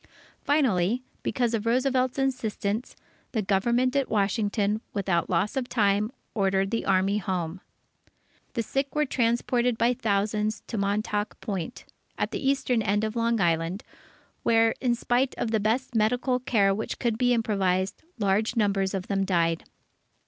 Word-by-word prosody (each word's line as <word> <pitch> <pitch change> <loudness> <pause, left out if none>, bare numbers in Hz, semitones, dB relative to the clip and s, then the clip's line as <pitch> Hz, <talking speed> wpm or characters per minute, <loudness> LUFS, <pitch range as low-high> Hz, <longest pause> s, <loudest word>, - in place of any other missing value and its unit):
Finally, 245 - +2 0.2
because 240 -3 0
of 225 0 -1
Roosevelt's 255 +1 +1
insistence, 235 -4 -2 0.4
the 220 -3 0
Government 235 +7 +1
at 275 -2 +1
Washington, 205 0 +1
without 190 -4 0
loss 185 +8 0
of 255 -2 -2
time, 210 -1 +2 0.2
ordered 195 -1 +1
the 230 - -2
Army 195 +2 +2
home. 180 -2 -3 0.9
The 230 - -1
sick 275 +5 -2
were 300 0 +2
transported 240 -1 +1
by 235 +2 +3
thousands 210 -1 -1
to - - -6
Montauk 205 +1 -1
Point, 200 +3 -5 0.3
at - - -1
the - - -3
eastern 265 -3 +1
end 205 0 +1
of 215 +1 -2
Long 230 0 +1
Island, 170 +2 0 0.6
where 225 0 +4
in 245 -2 +2
spite 245 +2 0
of 225 - -2
the 220 - +2
best 235 +5 0
medical 245 +3 +1
care 205 -6 +2
which 215 +3 -4
could 235 -2 0
be 245 -1 +3
improvised, 195 -4 0 0.2
large 210 +2 +1
numbers 200 -3 +1
of 185 -1 -3
them 195 -1 0
died. 170 -3 +1
215 Hz, 150 wpm, -26 LUFS, 195-245 Hz, 0.9 s, where